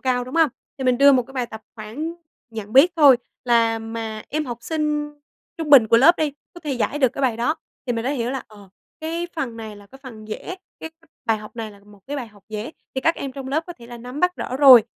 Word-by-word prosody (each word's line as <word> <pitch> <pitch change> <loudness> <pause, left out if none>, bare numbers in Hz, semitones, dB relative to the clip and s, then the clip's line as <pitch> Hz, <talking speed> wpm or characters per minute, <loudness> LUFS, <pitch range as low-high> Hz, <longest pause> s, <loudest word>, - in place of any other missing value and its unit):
cao, 250 -1 0
đúng 255 - -9
hông? 325 -2 +5 0.3
Thì 265 - -3
mình 250 -1 +3
đưa 280 0 +8
một 255 -2 +4
cái 270 - -15
bài 250 -2 -1
tập 220 -1 -10
khoảng 245 +10 -5 0.4
nhận 220 -1 -7
biết 300 +7 +7
thôi 285 -5 +8 0.3
là 230 -2 +3
mà 225 -1 -5
em 310 +1 -1
học 240 -1 -5
sinh 300 +2 -1 0.5
trung 310 -2 -3
bình 250 -6 +8
của 230 - +6
lớp 320 +9 +7
đi, 305 -3 0 0.2
có 345 - -11
thể 295 -3 -3
giải 265 +4 -1
được 260 -3 +4
cái 275 - -5
bài 240 -4 +2
đó. 245 +7 +1 0.3
Thì 245 - 0
mình 230 0 -2
đã 265 - 0
hiểu 245 -3 -1
là, 265 -1 -3
ờ, 205 -3 -15 0.3
cái 330 +2 -3
phần 245 -7 -3
này 220 -2 -7
là 205 0 -15
cái 270 +5 -15
phần 220 -5 -10
dễ, 220 +11 -5 0.3
cái 320 - -6 0.4
bài 225 -1 +2
học 215 +3 -12
này 220 -2 -4
là 200 -1 -16
một 205 -1 -18
cái 290 - -4
bài 255 -4 -4
học 205 -2 -21
dễ 215 +6 -5 0.2
thì 265 - -1
các 330 +5 +3
em 275 -2 -5
trong 265 -1 -7
lớp 315 +4 0
có 350 - -6
thể 235 - -12
là 240 0 -9
nắm 250 +5 -7
bắt 360 0 +2
rõ 255 - -4
rồi. 265 -5 +9
255 Hz, 265 wpm, -22 LUFS, 225-290 Hz, 0.5 s, rồi